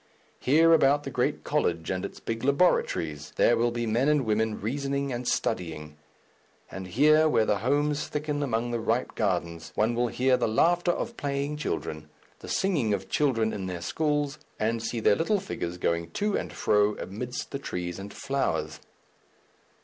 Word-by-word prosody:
Here 160 +5 +5
about 145 -2 +4
the 135 - -5
great 125 +5 -1
college 85 - 0
and 95 0 -2
its - - -6
big 115 +1 -4
laboratories 80 - +1
there 120 - +4
will 120 +1 +2
be 120 0 -2
men 120 +6 +2
and 150 -4 +2
women 110 0 0
reasoning 140 +4 -2
and 120 +1 -4
studying; 80 -7 -2 0.8
and 95 -1 -6
here, 155 - +4
where 115 -7 +3
the 105 - +1
homes 145 +5 +1
thicken 150 0 -2
among 120 -3 -1
the 120 - -1
ripe 115 +2 -1
gardens, 85 -5 -2
one 110 +2 +2
will 120 +1 +1
hear 125 +2 +2
the - - 0
laughter 175 +11 +2
of 230 +6 -4
playing 140 +1 -2
children, 75 - -4 0.3
the - - -10
singing 145 - +1
of 95 -1 -8
children 115 -7 +1
in 95 -2 -4
their 90 -1 -4
schools, 150 - -1 0.2
and 115 +1 0
see 115 0 -3
their 105 - +4
little 205 - +1
figures 90 - -5
going 85 -1 -1
to 210 0 0
and - - -3
fro 105 0 +2
amidst 120 +6 -5
the 140 - -3
trees 90 -8 -4
and 100 +1 -7
flowers.... 140 0 -2
120 Hz, 170 wpm, -27 LUFS, 105-145 Hz, 0.8 s, Here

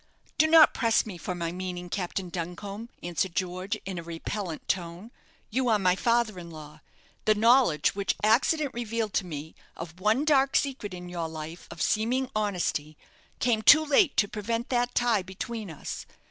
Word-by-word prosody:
"Do 315 - +6
not 320 -1 +7
press 230 -2 +2
me 190 -6 -8
for 180 +3 -4
my 170 -1 -3
meaning, 180 0 -5
Captain 180 0 -3
Duncombe," 195 +6 -6
answered 175 +1 -2
George, 185 +3 -2
in 190 -2 -4
a - - -7
repellant 170 +1 -5
tone; 180 +4 -3 0.4
"you 255 +3 0
are 220 - +4
my 185 -2 +2
father 230 -2 +1
in 170 -1 -9
law. 155 -2 -11 0.4
The 215 +1 +4
knowledge 230 - +4
which 200 0 -1
accident 265 +7 +3
revealed 230 -2 -3
to 185 - 0
me 155 -1 -7 0.2
of 165 +1 -8
one 220 +9 +2
dark 275 -3 +3
secret 255 -9 -1
in 180 0 -8
your 170 -2 -4
life 160 +2 -8
of 170 - -4
seeming 250 +4 0
honesty 180 -7 -1 0.4
came 230 -3 +1
too 310 +7 +7
late 300 +3 +3
to 205 - +4
prevent 230 +4 -3
that 245 -1 0
tie 235 -4 +2
between 200 +3 -6
us. 155 - -7
200 Hz, 175 wpm, -27 LUFS, 175-235 Hz, 0.4 s, not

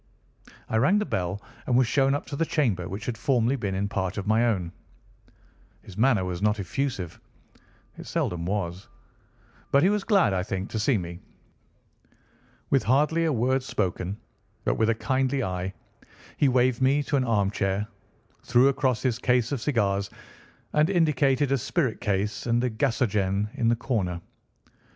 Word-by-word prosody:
I 110 - 0
rang 140 - +4
the 210 - 0
bell 90 - -2 0.3
and 125 - +3
was 130 - +5
shown 135 +3 +2
up 145 - -4
to 140 - -6
the 165 - +1
chamber 120 - 0
which 100 +4 -6
had 120 - -2
formerly 125 0 +2
been 100 -7 -3
in 100 +1 -1
part 100 -1 -3
my 110 +3 +3
own. 90 -7 -1 1.1
His 95 - -12
manner 110 -4 +3
was 90 -1 -4
not 105 +1 +1
effusive. 100 - -3 0.8
It - - -9
seldom 85 -1 -2
was; 95 0 -3 0.8
but 140 +2 +4
he 185 - +5
was 205 -1 0
glad, 195 - +3
I 95 - 0
think, 95 0 -4
to 110 - -2
see 110 +3 +2
me. 85 -2 -6 1.5
With 135 - +4
hardly 150 +6 +2
a 160 - +2
word 130 +1 +1
spoken, 95 -5 -2 0.5
but - - +2
with 110 0 +1
a 115 - +2
kindly 130 +2 0
eye, 90 -1 -3 0.6
he 140 - +3
waved 125 -1 +2
me 140 +3 +3
to 145 - -1
an 135 - +2
armchair, 100 -3 0 0.6
threw 125 +3 +4
across 135 -4 0
his 125 -3 0
case 125 -1 +1
of 135 -5 -2
cigars, 100 -7 0 0.6
and 150 +3 +3
indicated 145 -6 +2
a 140 - +2
spirit 125 -3 -1
case 105 0 -1
and 120 +1 +2
a 125 - 0
gasogene 105 -5 0
in 115 - 0
the 120 - +4
corner. 100 -8 -2
115 Hz, 165 wpm, -26 LUFS, 100-135 Hz, 1.5 s, was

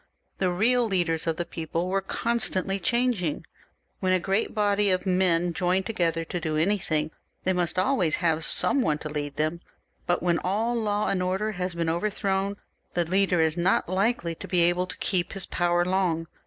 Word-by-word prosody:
The 185 - +2
real 230 +7 +2
leaders 175 -5 0
of 160 -1 0
the 175 - -2
people 165 +1 -3
were 195 +1 0
constantly 195 -2 -1
changing. 235 - 0 0.5
When 185 0 +1
a 185 - +3
great 195 +6 -1
body 205 -1 +2
of 185 0 +1
men 180 -2 +2
join 180 +3 +1
together 170 -6 -1
to 175 - -4
do 155 -2 -2
anything, 155 -3 0 0.3
they 185 - +2
must 180 -1 -1
always 185 - +2
have 165 -2 0
some 180 - +4
one 155 -9 +1
to 155 - -7
lead 145 -1 -4
them, 155 +3 -1 0.5
but 175 0 +1
when 175 -2 +2
all 215 +6 0
law 210 -3 0
and 185 - 0
order 190 +4 -1
has 180 -2 -4
been 170 -1 -1
overthrown, 195 +3 -1 0.4
the 175 -1 +2
leader 185 0 +2
is 160 -1 +1
not 180 +2 +2
likely 185 -1 0
to - - -9
be 180 -2 +2
able 175 +2 +2
to - - -8
keep 180 -2 -1
his 195 -2 -2
power 175 0 +1
long. 180 -3 0
180 Hz, 185 wpm, -26 LUFS, 170-195 Hz, 0.5 s, some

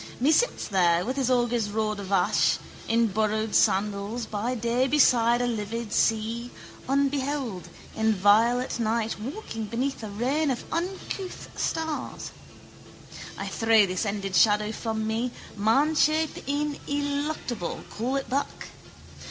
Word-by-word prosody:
Me 275 +5 +3
sits 485 +10 +2
there 175 -3 +2
with 255 +3 -2
his 265 -2 0
augur's 240 -3 +1
rod 215 0 -1
of 200 -1 -7
ash, 195 - +3 0.3
in 230 +1 +3
borrowed 215 +1 0
sandals, 205 +4 +1
by 225 +4 -2
day 235 +3 +1
beside 245 -4 +4
a - - +1
livid 225 -1 -3
sea, 225 +2 +1 0.4
unbeheld, 275 -8 -1 0.3
in 220 0 +2
violet 225 +6 +3
night 225 -1 -1
walking 225 - -5
beneath 250 +6 -2
a 215 - -6
reign 265 +9 0
of 250 -3 -2
uncouth 370 +2 -4
stars. 320 -2 -3 1.1
I - - -4
throw 225 -2 +4
this 185 +1 -2
ended 200 -2 -3
shadow 210 +4 +4
from 220 -1 -3
me, 225 +3 -1 0.3
manshape 300 +9 +2
ineluctable, 285 - -2
call 245 +5 -2
it 275 - -2
back. 275 +3 -3
230 Hz, 125 wpm, -26 LUFS, 215-275 Hz, 1.1 s, beside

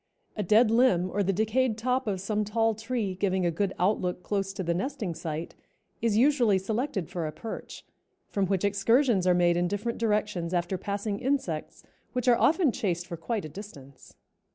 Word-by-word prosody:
A 210 - -2
dead 215 +4 +4
limb 190 -7 +3
or 205 - 0
the 195 0 +2
decayed 220 +4 +1
top 255 +2 0
of 195 -3 -1
some 210 +3 -1
tall 225 +2 +1
tree 220 -2 -2
giving 185 -1 0
a 170 - +2
good 190 +4 -1
outlook 180 -1 0
close 195 -2 -1
to 195 -1 -4
the 170 0 0
nesting 215 -2 -3
site, 160 0 -5 0.5
is 220 -2 +2
usually 245 -5 +4
selected 215 - -2
for 170 -3 -3
a - - -4
perch, 220 +8 -8 0.4
from 195 -2 0
which 195 +1 0
excursions 200 +1 +3
are 180 - +5
made 175 -1 +3
in 175 0 +1
different 205 +5 -3
directions 210 -6 0
after 175 +2 0
passing 200 +2 -3
insects, 255 - -2 0.3
which 250 -1 -2
are 245 - +7
often 320 -3 +4
chased 175 -6 -2
for 175 -1 -6
quite 200 +4 -3
a - - -6
distance. 145 -7 -12
200 Hz, 185 wpm, -28 LUFS, 180-225 Hz, 0.5 s, are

